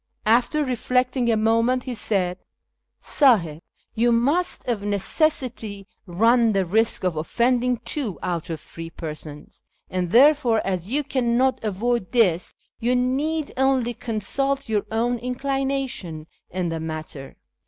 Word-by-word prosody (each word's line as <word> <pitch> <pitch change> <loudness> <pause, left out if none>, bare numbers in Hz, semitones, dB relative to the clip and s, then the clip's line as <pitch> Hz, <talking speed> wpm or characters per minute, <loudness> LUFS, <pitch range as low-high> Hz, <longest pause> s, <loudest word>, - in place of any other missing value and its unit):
After 245 +7 +2
reflecting 250 0 0
a 225 - +2
moment, 230 +3 +2
he 255 - -4
said, 190 -5 -1 0.3
" - - -55 0.2
Sdhih, 180 - +4 0.3
you 235 +1 +2
must 280 +11 +1
of 235 -5 -1
necessity 210 - -1 0.2
run 230 +5 +3
the 195 -1 +1
risk 220 +5 +1
of 180 -3 0
offending 245 +9 +1
two 240 - -2
out 175 -3 -3
of 160 -2 -4
three 165 +2 -9
persons, 155 -2 -8 0.3
and 180 -1 -1
therefore, 250 - +5
as 185 +1 -2
you 295 +2 +1
cannot 255 -1 +1
avoid 220 +1 -1
this, 190 -8 +2 0.2
you 245 +2 +1
need 280 +5 0
only 260 -2 +2
consult 270 +6 -2
your 215 -2 -1
own 235 +2 0
inclination 260 - -3 0.2
in 180 -1 -2
the 165 0 -3
matter. 155 -4 -7
230 Hz, 130 wpm, -23 LUFS, 185-255 Hz, 0.3 s, therefore